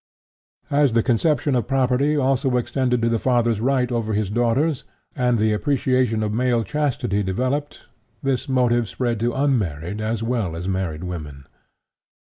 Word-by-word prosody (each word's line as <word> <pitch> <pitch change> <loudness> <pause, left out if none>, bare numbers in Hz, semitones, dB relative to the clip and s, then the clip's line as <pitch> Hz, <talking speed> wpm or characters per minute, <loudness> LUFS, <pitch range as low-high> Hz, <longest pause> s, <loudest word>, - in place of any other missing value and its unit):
As 140 -3 +3
the 115 -1 +3
conception 145 +4 +1
of 120 -2 0
property 135 +3 +1
also 130 -2 +1
extended 125 0 0
to 115 - +3
the 115 -1 +1
father's 120 -3 +1
right 130 0 +1
over 115 -2 -1
his 105 -2 -1
daughters, 120 +6 +1 0.3
and 125 -3 +1
the 110 0 +2
appreciation 125 -2 +1
of 105 - -1
female 120 +1 +1
chastity 135 -8 -1
developed, 130 +10 -2 0.4
this 135 -1 -1
motive 120 -3 +2
spread 120 0 -2
to 120 +2 -1
unmarried 105 - -1
as 110 +1 -2
well 115 -8 -1
as 85 +2 -5
married 90 -4 -2
women. 75 -6 -7
120 Hz, 150 wpm, -22 LUFS, 110-130 Hz, 0.4 s, As